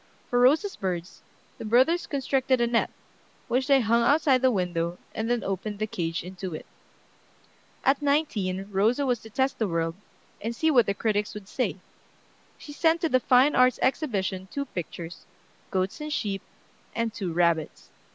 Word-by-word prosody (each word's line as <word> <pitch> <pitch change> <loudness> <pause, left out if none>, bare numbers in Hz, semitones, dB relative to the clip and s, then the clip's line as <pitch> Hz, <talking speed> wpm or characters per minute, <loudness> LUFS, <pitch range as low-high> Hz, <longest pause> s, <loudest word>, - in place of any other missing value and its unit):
For 245 - +3
Rosa's 305 +11 +4
birds, 180 -2 -4 0.4
the - - -6
brothers 255 +10 +3
constructed 265 -2 +1
a 240 - +3
net, 235 0 +1 0.6
which 260 +2 0
they 275 -2 +5
hung 230 +1 +3
outside 275 0 +4
the 260 - +5
window, 175 -5 -1 0.2
and 220 +1 -3
then 240 -1 0
opened 195 +2 -3
the 215 - -1
cage 165 -6 -3
into 185 -1 -6
it. - - -8 1.2
At 275 +2 +3
nineteen 215 -11 0
Rosa 225 +8 +2
was 245 -3 +1
to 220 - -13
test 265 +5 0
the 220 - +1
world, 165 -2 -1 0.5
and 230 +2 -3
see 320 +5 +2
what 245 -5 +4
the 200 - 0
critics 210 0 -1
would 205 -2 -8
say. 255 - -2 0.8
She 290 - -10
sent 330 +2 +2
to 330 - +1
the 255 - +4
Fine 255 +3 +4
Arts 255 -1 +4
Exhibition 195 - -1
two 280 0 -3
pictures, 175 - -7 0.4
"Goats 190 +8 -2
and 300 0 -5
Sheep" 200 -8 -2 0.5
and 230 -2 -1
"Two 190 -6 -3
Rabbits." 170 -2 0
230 Hz, 170 wpm, -26 LUFS, 190-265 Hz, 1.2 s, they